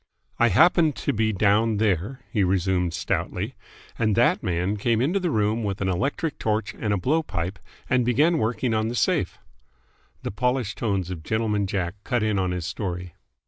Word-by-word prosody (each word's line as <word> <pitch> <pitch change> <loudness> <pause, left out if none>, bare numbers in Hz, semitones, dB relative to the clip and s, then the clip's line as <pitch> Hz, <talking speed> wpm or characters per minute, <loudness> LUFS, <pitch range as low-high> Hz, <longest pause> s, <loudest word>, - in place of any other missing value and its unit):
"I 120 - +5
happened 155 - +4
to - - -1
be 110 0 +1
down 105 +2 +2
there," 105 +4 0
he 105 -6 +2
resumed 90 -1 +1
stoutly, 80 - -2 0.5
"and 110 -3 +2
that - - +3
man 90 +4 -1
came 115 +2 +1
into 160 +11 +1
the 180 -2 -1
room 110 -2 +1
with 100 -2 -2
an 95 - 0
electric 140 - -1
torch 105 -1 -1
and 105 - -3
a 100 - +2
blowpipe 95 - -1 0.3
and 125 -1 +2
began 150 +8 +3
working 115 +1 0
on 110 0 +1
the 120 - -3
safe - - +1 0.4
" - - -38
The - - -3
polished 125 -1 -1
tones 95 -5 -1
of 85 -4 -5
Gentleman 105 +2 0
Jack 90 -2 -2
cut 120 -4 0
in 105 -2 +1
on 95 -1 0
his 90 -2 -3
story. 90 -1 -4
105 Hz, 185 wpm, -25 LUFS, 95-120 Hz, 0.5 s, I